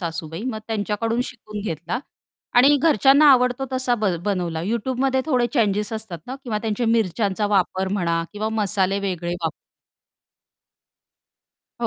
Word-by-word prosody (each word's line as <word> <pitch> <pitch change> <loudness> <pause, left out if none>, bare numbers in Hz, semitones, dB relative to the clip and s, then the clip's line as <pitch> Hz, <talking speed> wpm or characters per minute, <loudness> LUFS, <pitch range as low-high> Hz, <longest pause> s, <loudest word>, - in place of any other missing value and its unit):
सासूबाई. 165 +1 -5
मग 250 -4 -3
त्यांच्याकडून 225 +2 -1
शिकून 215 -5 -8
घेतला 170 +5 -3 0.6
आणि 280 +4 +6
घरच्यांना 280 0 +5
आवडतो 250 +1 +2
तसा 255 -1 +1
ब 215 -3 -1 0.2
बनवला 175 -5 -1
Youtubeमध्ये 260 +5 0
थोडे 250 -5 +2
चेंजेस 210 -3 +1
असतात 220 -6 -5
ना 255 - -5
किंवा 220 -4 -2
त्यांचे 225 +2 -1
मिरच्यांचा 210 -2 +1
वापर 190 -1 +1
म्हणा 170 -4 0
किंवा 215 +1 -2
मसाले 195 -1 +1
वेगळे 175 -3 -3
वाप 160 - 0 2.3
हो, - - +1
215 Hz, 130 wpm, -22 LUFS, 190-245 Hz, 2.3 s, आणि